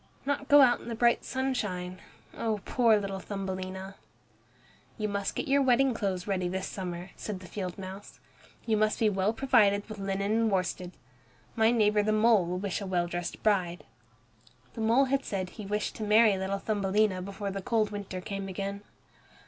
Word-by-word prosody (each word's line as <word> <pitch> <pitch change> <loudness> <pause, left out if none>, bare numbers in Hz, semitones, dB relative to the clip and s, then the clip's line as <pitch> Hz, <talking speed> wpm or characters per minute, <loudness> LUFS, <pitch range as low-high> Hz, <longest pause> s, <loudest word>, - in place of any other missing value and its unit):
Not 280 0 -1
go 290 0 +8
out 245 -3 +5
in - - -11
the 230 - -3
bright 235 +1 +3
sunshine! 210 -9 -3 0.3
Oh, 220 -2 -2
poor 230 -3 +4
little 195 -1 -3
Thumbelina! 190 -1 -5 1.0
"You 215 -2 -1
must 200 -1 -2
get - - -3
your 280 +1 +4
wedding 265 0 +3
clothes 190 -4 -2
ready 185 -3 -1
this 190 +1 -3
summer," 180 -1 -6
said 205 -3 -5
the 185 - -12
field 185 0 -5
mouse. 195 +1 -9 0.5
"You 220 -2 +2
must 215 0 +2
be 220 - +3
well 195 +1 +1
provided 205 -5 +3
with 215 -2 -8
linen 195 +1 -1
and 225 0 +2
worsted. 185 -1 -1 0.6
My 220 0 +4
neighbor 210 -3 +3
the 215 +1 +1
mole 215 -4 +4
will 180 +1 -2
wish 200 +2 -3
a 200 - -4
well 175 -2 +1
dressed 175 0 -5
bride." 180 -6 +1 0.9
The 225 - -6
mole 230 +5 +4
had 275 +1 0
said 185 -2 -3
he 210 -3 -8
wished 210 +1 -2
to 220 - -4
marry 215 0 +5
little 190 +1 -2
Thumbelina 200 -1 +1
before 200 +1 -5
the 195 0 -4
cold 215 +1 +1
winter 200 -3 -5
came 195 +1 -5
again. 195 +1 -4
200 Hz, 180 wpm, -29 LUFS, 190-220 Hz, 1.0 s, go